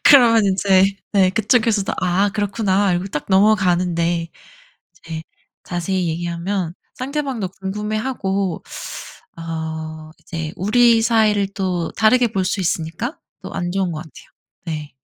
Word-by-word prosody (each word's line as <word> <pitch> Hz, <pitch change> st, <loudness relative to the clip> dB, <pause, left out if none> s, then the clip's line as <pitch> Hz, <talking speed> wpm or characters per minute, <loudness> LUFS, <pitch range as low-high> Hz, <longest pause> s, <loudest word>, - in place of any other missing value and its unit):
그러면 235 Hz, -6 st, +7 dB
인제 195 Hz, 0 st, +3 dB, 0.2 s
네 190 Hz, -2 st, +4 dB
그쪽에서도 220 Hz, -1 st, +2 dB
"아 185 Hz, +3 st, +2 dB
그렇구나." 205 Hz, -2 st, +1 dB
이러고 175 Hz, +2 st, -1 dB
딱 150 Hz, -6 st, -4 dB
넘어가는데 180 Hz, -4 st, +2 dB, 0.7 s
이제 160 Hz, -1 st, -7 dB, 0.4 s
자세히 180 Hz, +1 st, -1 dB
얘기하면 170 Hz, +2 st, -2 dB, 0.2 s
상대방도 265 Hz, -7 st, -3 dB
궁금해하고 200 Hz, -2 st, -2 dB, 0.7 s
어 160 Hz, -1 st, -5 dB
이제 160 Hz, -2 st, -5 dB
우리 230 Hz, +4 st, +4 dB
사이를 215 Hz, -3 st, +3 dB
또 180 Hz, -4 st, -2 dB
다르게 235 Hz, +2 st, +4 dB
볼 190 Hz, -3 st, 0 dB
수 195 Hz, +1 st, -1 dB
있으니까 180 Hz, -, -2 dB, 0.2 s
또 -, -, -7 dB
안 175 Hz, 0 st, -2 dB
좋은 190 Hz, -2 st, 0 dB
것 155 Hz, -, -4 dB
같아요. 155 Hz, -, -15 dB, 0.4 s
네. 155 Hz, -3 st, -5 dB
190 Hz, 280 characters per minute, -20 LUFS, 170-215 Hz, 0.7 s, 그러면